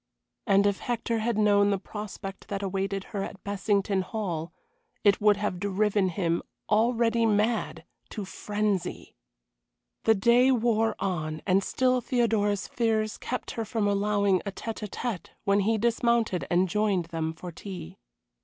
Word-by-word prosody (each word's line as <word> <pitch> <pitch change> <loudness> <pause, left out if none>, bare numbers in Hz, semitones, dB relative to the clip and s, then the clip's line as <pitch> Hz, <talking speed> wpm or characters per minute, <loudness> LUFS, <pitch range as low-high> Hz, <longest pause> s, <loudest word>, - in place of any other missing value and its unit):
And 200 -1 +4
if 200 -1 +1
Hector 230 -1 -1
had 225 0 0
known 205 -1 +4
the 200 - +2
prospect 195 -1 -7
that 200 0 -3
awaited 195 0 -2
her 200 - -1
at 195 0 -7
Bessington 200 -1 0
Hall, 180 -5 -4 0.5
it 205 -1 +4
would 210 -1 +5
have 205 -3 -2
driven 200 0 +1
him 170 -2 0 0.3
already 230 +1 +2
mad 215 +2 0 0.2
to 210 -3 -5
frenzy. 205 -2 -2 0.9
The 225 - +5
day 235 +6 +4
wore 225 -2 +2
on, 160 -5 -3
and 195 +1 +3
still 255 +2 +1
Theodora's 220 -5 +1
fears 220 -2 0
kept 250 - -4
her 230 - -3
from 220 -1 -1
allowing 200 -1 +2
a 200 - -4
tête 225 +3 -6
à - - -23
tête 220 -2 -4 0.2
when 200 0 +3
he 220 +3 +2
dismounted 235 -3 +1
and 180 +2 +3
joined 200 -2 +1
them 160 -1 -1
for 175 +2 -8
tea. 180 - -8
205 Hz, 150 wpm, -27 LUFS, 195-225 Hz, 0.9 s, would